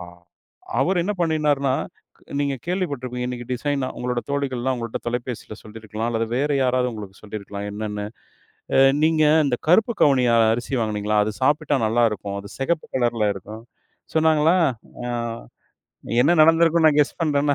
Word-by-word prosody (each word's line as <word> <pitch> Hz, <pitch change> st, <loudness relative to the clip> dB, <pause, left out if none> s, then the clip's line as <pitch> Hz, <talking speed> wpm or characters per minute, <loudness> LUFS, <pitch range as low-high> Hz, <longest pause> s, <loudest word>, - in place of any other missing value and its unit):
அ, 90 Hz, -, -7 dB, 0.8 s
அவரு 180 Hz, +6 st, +2 dB
என்ன 210 Hz, -, -1 dB
பண்ணினார்னா, 150 Hz, -5 st, +1 dB, 0.7 s
நீங்க 140 Hz, -1 st, 0 dB
கேள்விப்பட்டிருப்பீங்க, 135 Hz, -9 st, -3 dB
இன்னைக்கு 120 Hz, -1 st, -6 dB
டிசைனா 135 Hz, +1 st, -1 dB
உங்களோட 125 Hz, -1 st, -2 dB
தோழிகள்லாம் 130 Hz, -2 st, -1 dB
உங்கள்ட்ட 115 Hz, -2 st, -5 dB
தொலைபேசியில 120 Hz, -2 st, -4 dB
சொல்லிருக்கலாம், 110 Hz, +1 st, -6 dB
அல்லது 115 Hz, 0 st, -1 dB
வேற 145 Hz, +3 st, 0 dB
யாராவது 125 Hz, 0 st, +1 dB
உங்களுக்கு 100 Hz, -3 st, -9 dB
சொல்லிருக்கலாம் 100 Hz, -1 st, -6 dB
என்னன்னு. 105 Hz, 0 st, -4 dB, 0.7 s
அ -, -, +4 dB, 0.2 s
"நீங்க 155 Hz, 0 st, +3 dB, 0.2 s
அந்த 130 Hz, -4 st, +1 dB
கருப்பு 220 Hz, +7 st, +4 dB
கவுனி 135 Hz, -4 st, +4 dB, 0.3 s
அரிசி 120 Hz, +4 st, -3 dB
வாங்குனீங்களா? 105 Hz, -1 st, -1 dB
அது 110 Hz, -, -3 dB
சாப்பிட்டா 145 Hz, 0 st, +2 dB
நல்லா 120 Hz, +2 st, +2 dB
இருக்கும். 100 Hz, -1 st, -5 dB
அது 100 Hz, 0 st, -11 dB
சிகப்பு 155 Hz, +4 st, -1 dB
கலர்ல 120 Hz, -4 st, +1 dB
இருக்கும்," 105 Hz, +4 st, -10 dB, 0.5 s
சொன்னாங்களா? 160 Hz, +2 st, +4 dB, 0.5 s
அ -, -, -3 dB, 1.1 s
என்ன 155 Hz, -, +4 dB
நடந்துருக்கும் 165 Hz, 0 st, +4 dB
நான் 150 Hz, -1 st, +4 dB
கெஸ் 145 Hz, -, -1 dB
பண்றேன்னா 145 Hz, -2 st, +2 dB
130 Hz, 140 wpm, -22 LUFS, 110-150 Hz, 1.1 s, அ